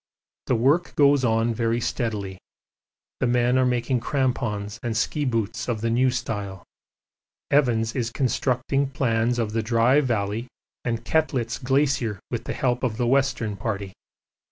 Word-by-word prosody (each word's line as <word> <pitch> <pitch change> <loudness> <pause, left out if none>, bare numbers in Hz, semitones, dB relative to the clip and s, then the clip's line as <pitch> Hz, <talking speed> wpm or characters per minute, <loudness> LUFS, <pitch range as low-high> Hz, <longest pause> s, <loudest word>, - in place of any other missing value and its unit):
The 125 - +2
work 140 +9 +2
goes 140 -2 +4
on 115 0 +2
very 115 +1 0
steadily 105 -6 -3 0.8
the - - +1
men 120 +1 +2
are 130 - +3
making 125 +1 0
crampons 115 -5 -2
and 115 -2 -2
ski 145 +5 0
boots 115 0 -2
of 110 -3 -1
the 115 0 0
new 130 +3 +3
style. 105 -6 -4 0.9
Evans 115 -6 +2
is 120 -3 -1
constructing 130 +2 0
plans 120 -3 0
of 115 -3 -1
the 115 - +1
Dry 115 +5 +3
Valley 115 -2 -1 0.4
and 115 -1 -2
Koettlitz 130 -6 0
Glacier 130 -6 +1
with - - -3
the - - -3
help 125 -2 0
of 115 -4 -1
the 120 - 0
Western 125 -4 +1
Party. 100 -2 -4
120 Hz, 150 wpm, -24 LUFS, 110-130 Hz, 0.9 s, goes